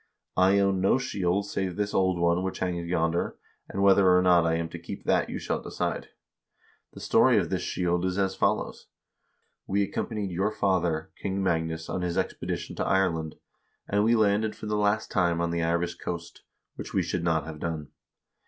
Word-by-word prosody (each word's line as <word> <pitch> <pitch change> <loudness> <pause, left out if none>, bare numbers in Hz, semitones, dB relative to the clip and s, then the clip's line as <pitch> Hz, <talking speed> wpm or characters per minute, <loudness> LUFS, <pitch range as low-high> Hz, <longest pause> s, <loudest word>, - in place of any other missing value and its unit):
I 95 +2 +4
own 100 -1 +2
no 95 +6 +4
shield 100 -6 -1
save 95 -3 -3
this 105 0 -2
old 95 -1 +2
one 85 +1 +2
which 95 0 -3
hangs 85 -2 -2
yonder, 85 -1 0 0.3
and 100 - -2
whether 95 -2 +6
or 90 - +3
not 90 -2 +5
I 80 - +2
am 85 0 -1
to 85 - -8
keep 85 - -8
that - - +1
you - - -4
shall - - -2
decide. - - -3 0.9
The - - -10
story - - +4
of - - 0
this - - 0
shield 90 0 -1
is 95 0 -1
as 95 -1 +1
follows: - - -1 0.8
We 100 +1 +1
accompanied 100 0 -3
your 95 +4 0
father, 90 -6 0
King 95 0 -2
Magnus, 80 -2 -1
on 90 - -3
his 90 -1 -2
expedition - - -3
to - - 0
Ireland, 85 -5 0 0.5
and 100 +1 +2
we 115 +2 +4
landed 110 0 +2
for - - -9
the 105 0 -1
last 105 +1 +1
time 85 -3 +2
on 85 0 0
the 85 0 -1
Irish 85 +1 0
coast, 85 -1 -6 0.4
which - - -7
we - - +3
should 85 - -2
not 80 -2 +1
have 80 -1 -8
done. 80 -3 -4
90 Hz, 190 wpm, -27 LUFS, 85-100 Hz, 0.9 s, whether